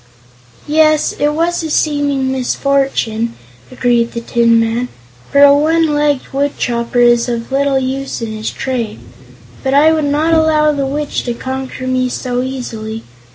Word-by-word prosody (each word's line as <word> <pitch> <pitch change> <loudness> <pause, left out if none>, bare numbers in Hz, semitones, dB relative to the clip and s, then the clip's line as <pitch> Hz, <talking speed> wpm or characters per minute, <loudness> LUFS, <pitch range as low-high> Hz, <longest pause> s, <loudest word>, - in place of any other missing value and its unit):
"Yes, 310 0 +3
it 295 +1 +1
was 340 +2 0
a 320 - -4
seeming 285 -3 0
misfortune," 260 -3 -1 0.4
agreed 240 -2 +1
the 235 - -3
Tin 235 0 +2
Man, 230 +2 0 0.4
"for 280 0 +5
a 285 0 +7
one 315 +1 +2
legged 290 -3 0
woodchopper 245 -4 -1
is 240 0 +4
of 235 +1 -4
little 275 0 +1
use 265 +1 -3
in 230 -2 -4
his 215 0 -4
trade. 235 -5 -4 0.6
But 265 0 0
I 310 +3 +5
would 310 -2 0
not 300 +3 +1
allow 315 -1 +3
the 280 -2 -2
Witch 290 +2 -2
to 240 -1 -2
conquer 260 +1 -5
me 255 0 0
so 245 0 -2
easily. 225 -4 -5
265 Hz, 155 wpm, -15 LUFS, 240-295 Hz, 0.6 s, a